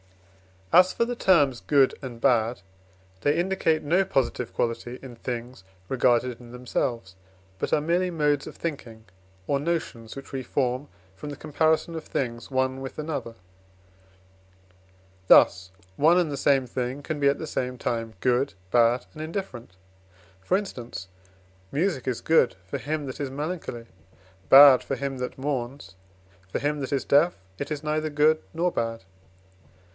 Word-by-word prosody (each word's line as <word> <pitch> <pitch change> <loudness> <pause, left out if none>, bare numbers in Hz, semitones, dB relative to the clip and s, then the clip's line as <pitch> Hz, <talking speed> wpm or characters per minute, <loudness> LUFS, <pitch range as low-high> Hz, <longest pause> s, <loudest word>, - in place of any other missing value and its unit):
As 185 +1 +6
for 235 - +1
the 245 0 -4
terms 145 - +3
good 140 -3 +3
and 125 -3 -7
bad, 115 -2 +2 0.6
they 145 +2 +2
indicate 170 -3 +1
no 175 +6 +3
positive 130 -8 -1
quality 120 +1 -2
in 125 -3 -9
things 120 -2 -6 0.3
regarded 125 -1 +2
in 120 -1 -13
themselves, 120 -5 -3 0.4
but - - -2
are 150 - +3
merely 175 +4 +1
modes 150 -4 0
of - - -9
thinking, 120 -9 -6 0.4
or 140 +7 0
notions 145 -8 -3
which 135 - -10
we 135 - -3
form 130 +2 -1 0.3
from 95 +10 -8
the 145 - -6
comparison 155 +3 0
of 160 -1 -6
things 120 -3 -3
one 130 0 0
with 135 - -7
another. 150 -7 -4 1.9
Thus 95 +1 +6 0.3
one 165 +4 +5
and 170 -4 +1
the 140 - -3
same 135 -1 +3
thing 125 +3 -4
can 155 0 -4
be 140 - +3
at 140 - +3
the - - -5
same 125 -4 -3
time 115 -1 -3
good, 125 0 +1 0.2
bad, 120 +1 +3
and 155 - -8
indifferent. 155 - -6 0.6
For 140 - +1
instance, 120 - -7 0.6
music 155 -2 -1
is 125 -3 -1
good 160 -9 +3
for 95 - -4
him 150 0 -3
that 130 +2 -7
is 140 -2 -2
melancholy, 145 -4 -5 0.6
bad 135 -1 +9
for 135 - -3
him 135 -1 -4
that 125 0 -5
mourns; 130 -7 -4 0.5
for - - -2
him 145 +1 -1
that 135 0 -3
is 135 - -1
deaf, 150 +5 +4 0.2
it 145 - -4
is 150 0 -3
neither 155 0 -1
good 155 +1 +3
nor 175 +2 0
bad. 115 - -3
135 Hz, 155 wpm, -26 LUFS, 120-155 Hz, 1.9 s, bad